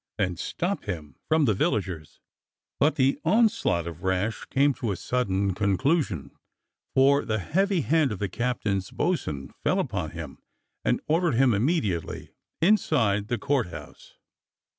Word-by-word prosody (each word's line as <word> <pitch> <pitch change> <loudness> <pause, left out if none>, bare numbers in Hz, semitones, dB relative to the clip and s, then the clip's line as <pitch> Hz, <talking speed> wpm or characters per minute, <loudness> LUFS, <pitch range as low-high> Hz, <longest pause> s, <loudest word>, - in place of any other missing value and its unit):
and 90 -5 -1
"Stop 190 +4 -2
him!" 80 -9 -5
from 155 -1 +3
the 110 - +3
villagers. 90 -5 -2 0.6
But 150 +2 +3
the 135 +1 +2
onslaught 200 - +2
of 85 0 -7
Rash 95 +4 -1
came 140 +1 +2
to 125 -6 -3
a - - -1
sudden 100 -3 0
conclusion, 105 - 0 0.6
for 140 +2 +5
the 110 -2 -1
heavy 190 - +1
hand 150 +2 +2
of 105 - -3
the 100 - -2
captain's 100 -3 -2
bo'sun 75 - -2
fell - - +2
upon - - -2
him - - -8 0.4
and - - +1
ordered 165 -2 +2
him 130 0 +4
immediately 105 - -1 0.3
inside 115 - +3
the 120 0 -1
Court 130 0 0
House. - - -11
115 Hz, 140 wpm, -26 LUFS, 95-150 Hz, 0.6 s, for